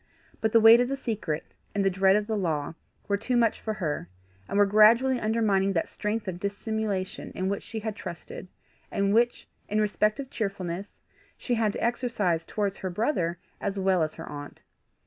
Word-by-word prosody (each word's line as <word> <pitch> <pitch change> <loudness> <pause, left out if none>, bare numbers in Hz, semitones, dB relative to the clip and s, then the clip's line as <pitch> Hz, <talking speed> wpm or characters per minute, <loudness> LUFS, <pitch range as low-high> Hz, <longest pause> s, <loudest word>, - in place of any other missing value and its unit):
But 220 - +1
the 230 - +6
weight 225 +1 +9
of 245 - +1
the 275 - -2
secret, 205 - -3 0.3
and 200 -1 +1
the - - +5
dread 190 +1 +4
of 210 0 +1
the 220 0 -2
law, 160 -7 -1 0.3
were 200 -1 +1
too 245 +4 0
much 230 -2 +2
for 220 -1 -3
her, 150 - -3 0.4
and - - -1
were 205 - +6
gradually 230 +5 +5
undermining 210 -3 +2
that 165 - 0
strength 210 0 -3
of 175 -2 -4
dissimulation 200 -1 -3
in 185 +1 -1
which 200 - -2
she 220 0 -6
had 215 -1 -3
trusted, 175 +1 -8 0.4
and 200 0 +1
which, 240 +2 +2 0.2
in 210 - +1
respect 210 +3 +1
of 275 -1 -6
cheerfulness, 195 -3 -4 0.4
she 250 - -2
had 225 -3 +2
to - - -4
exercise 220 -9 0
towards 200 -2 -2
her 185 - -4
brother 175 - 0 0.2
as 200 0 -3
well 190 -2 +2
as 155 -1 -1
her - - -8
aunt. 145 -1 -8
205 Hz, 190 wpm, -27 LUFS, 185-225 Hz, 0.4 s, weight